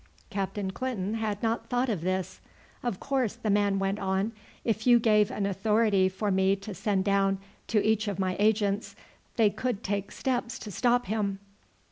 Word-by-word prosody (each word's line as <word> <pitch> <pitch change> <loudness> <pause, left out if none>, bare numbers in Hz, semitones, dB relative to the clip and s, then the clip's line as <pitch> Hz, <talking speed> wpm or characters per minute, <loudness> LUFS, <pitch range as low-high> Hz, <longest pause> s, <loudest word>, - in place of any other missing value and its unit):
Captain 195 0 -2
Clinton 215 -4 -3
had 215 -2 -2
not 225 +1 -1
thought 245 +1 +1
of 210 -9 -1
this. 185 +1 -2 0.4
"Of 240 -6 -2
course," 260 -6 0
the 230 -3 -1
man 200 -1 +2
went 195 +1 -1
on, 195 +2 0 0.3
"if 220 0 0
you 240 -1 +8
gave 210 -3 +4
an 200 - -2
authority 200 0 +2
for 200 +2 -2
me 190 +1 +3
to 200 +1 -8
send 190 +1 0
down 195 -1 +2 0.3
to 220 - +2
each 220 0 +2
of 200 - -2
my 185 -1 0
agents, 205 -1 +1 0.4
they 220 -3 +4
could 245 -3 -3
take 200 0 -2
steps 245 -3 -2
to 210 - -8
stop 245 +4 +2
him." 200 -1 -1
205 Hz, 175 wpm, -28 LUFS, 195-225 Hz, 0.4 s, you